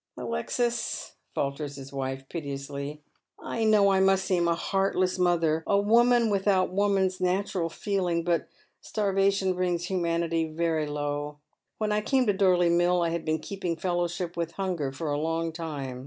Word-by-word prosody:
" -, -, -46 dB
Alexis," 235 Hz, -, -2 dB, 0.2 s
falters 140 Hz, +1 st, -2 dB
his 135 Hz, 0 st, -10 dB
wife, 135 Hz, 0 st, -4 dB
piteously, 140 Hz, -1 st, -5 dB, 0.2 s
" -, -, -60 dB
I 230 Hz, -, -3 dB
know 210 Hz, -2 st, +5 dB
I 190 Hz, -, +3 dB
must 190 Hz, 0 st, +3 dB
seem 175 Hz, -2 st, +2 dB
a 170 Hz, -, +2 dB
heartless 185 Hz, 0 st, 0 dB
mother, 165 Hz, -3 st, +2 dB
a 200 Hz, -, +3 dB
woman 235 Hz, +2 st, +4 dB
without 195 Hz, -2 st, +2 dB
woman's 190 Hz, -2 st, +1 dB
natural 185 Hz, -1 st, 0 dB
feeling, 180 Hz, -3 st, -1 dB
but 170 Hz, -2 st, 0 dB, 0.3 s
starvation 195 Hz, -2 st, +1 dB
brings 180 Hz, -1 st, -1 dB
humanity 170 Hz, -2 st, 0 dB
very 160 Hz, -1 st, 0 dB
low. 145 Hz, 0 st, -3 dB, 0.4 s
When 215 Hz, -1 st, -1 dB
I 210 Hz, 0 st, +1 dB
came 260 Hz, +3 st, +2 dB
to 205 Hz, -, +3 dB
Dorley 180 Hz, -3 st, +3 dB
Mill 175 Hz, +1 st, +3 dB
I 170 Hz, -, +1 dB
had 170 Hz, 0 st, -2 dB
been 155 Hz, 0 st, +1 dB
keeping 180 Hz, +1 st, -4 dB
fellowsliip 175 Hz, 0 st, -2 dB
with 170 Hz, -1 st, -3 dB
Hunger 180 Hz, -8 st, -2 dB
for 150 Hz, +2 st, -4 dB
a 145 Hz, -, 0 dB
longtime. 160 Hz, -5 st, -3 dB
175 Hz, 160 wpm, -27 LUFS, 155-195 Hz, 0.4 s, know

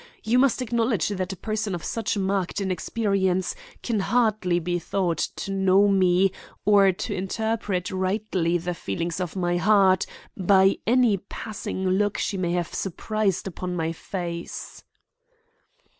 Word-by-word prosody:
You 235 Hz, +3 st, +3 dB
must 260 Hz, -1 st, +3 dB
acknowledge 230 Hz, -6 st, 0 dB
that 190 Hz, -1 st, -3 dB
a -, -, -5 dB
person 215 Hz, -1 st, -2 dB
of 170 Hz, -, -7 dB
such 220 Hz, -2 st, -2 dB
marked 195 Hz, 0 st, -1 dB
inexperience 190 Hz, 0 st, 0 dB, 0.3 s
can 230 Hz, -4 st, 0 dB
hardly 215 Hz, -5 st, +2 dB
be 175 Hz, +1 st, -1 dB
thought 175 Hz, -1 st, -1 dB, 0.2 s
to 195 Hz, -, -5 dB
know 195 Hz, +1 st, +4 dB
me 190 Hz, -1 st, +3 dB, 0.3 s
or 200 Hz, -1 st, +6 dB
to 180 Hz, -, -4 dB
interpret 195 Hz, -1 st, -2 dB
rightly 185 Hz, -2 st, 0 dB
the 175 Hz, +1 st, -3 dB
feelings 165 Hz, -, -3 dB
of 180 Hz, -1 st, -3 dB
my 175 Hz, -2 st, 0 dB
heart 190 Hz, 0 st, +4 dB, 0.3 s
by 190 Hz, +1 st, +4 dB
any 240 Hz, -3 st, +4 dB
passing 195 Hz, -1 st, -5 dB
look 205 Hz, +2 st, +1 dB
she 205 Hz, -, -1 dB
may 175 Hz, -2 st, -1 dB
have 175 Hz, -1 st, -2 dB
surprised 200 Hz, +1 st, -1 dB
upon 180 Hz, -1 st, -4 dB
my 165 Hz, -1 st, -1 dB
face." 170 Hz, 0 st, -6 dB
190 Hz, 140 wpm, -25 LUFS, 180-210 Hz, 0.3 s, or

